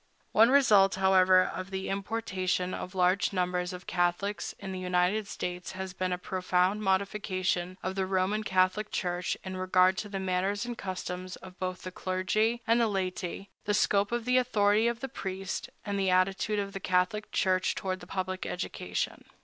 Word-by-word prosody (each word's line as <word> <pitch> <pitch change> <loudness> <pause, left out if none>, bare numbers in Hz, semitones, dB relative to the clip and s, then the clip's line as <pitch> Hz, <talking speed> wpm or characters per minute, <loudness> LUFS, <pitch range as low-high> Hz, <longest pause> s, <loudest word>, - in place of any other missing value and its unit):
One 225 +2 +6
result, 210 -9 +5
however, 185 -1 +5
of 185 0 -5
the 190 0 -4
importation 190 -3 -1
of 185 - -6
large 185 +2 +3
numbers 180 -1 0
of 180 -1 -8
Catholics 175 +4 -1
into 195 -1 -7
the 185 - -4
United 180 +3 +1
States 180 -2 -5
has 190 0 -5
been 185 0 -2
a 180 - 0
profound 185 +2 0
modification 190 -2 0
of 185 - -2
the 190 -1 -1
Roman 190 +3 +1
Catholic 185 +2 +1
Church 180 -1 -2
in 185 -1 -5
regard 185 0 +3
to 210 - -5
the 195 -1 -3
manners 190 +3 0
and 240 0 -4
customs 185 -2 -5
of 185 0 -13
both 185 -1 -3
the 185 - -5
clergy 215 +6 0
and 230 +1 +3
the 230 - +3
laity, 190 -1 -3
the 205 - +1
scope 200 0 +2
of 240 -1 -1
the 250 0 +3
authority 215 -3 +3
of 235 0 -2
the 270 - -2
priest, 190 -4 -5 0.2
and 200 -1 -2
the 190 -1 +2
attitude 190 +3 +2
of 200 -1 -2
the 195 - -4
Catholic 185 +3 0
Church 185 -1 +1
toward 185 -1 -3
public 185 0 -3
education. - - -3
190 Hz, 175 wpm, -29 LUFS, 185-205 Hz, 0.2 s, One